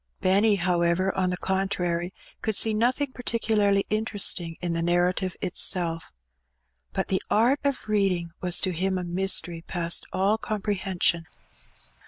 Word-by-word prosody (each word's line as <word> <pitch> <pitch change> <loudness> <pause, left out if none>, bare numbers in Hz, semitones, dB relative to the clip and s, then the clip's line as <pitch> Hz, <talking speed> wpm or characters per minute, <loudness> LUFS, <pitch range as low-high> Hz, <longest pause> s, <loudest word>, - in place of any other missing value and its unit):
Benny, 200 +3 +3
however, 175 0 +1
on 185 -1 +1
the 180 - -2
contrary, 185 -2 -1 0.3
could 220 - -1
see 220 +1 +2
nothing 255 +5 +1
particularly 220 -5 +1
interesting 205 -6 0
in 175 -1 -2
the 165 - -1
narrative 180 +2 +1
itself. 170 -2 0 0.8
But - - -3
the 190 - +1
art 245 +7 +3
of 280 -5 -2
reading 190 -5 0
was 180 -1 +3
to 185 - 0
him 190 +2 -1
a 180 - -3
mystery 175 -1 +1
past 170 0 -3
all 200 +4 +1
comprehension. 190 -6 -1
190 Hz, 135 wpm, -26 LUFS, 175-210 Hz, 0.8 s, Benny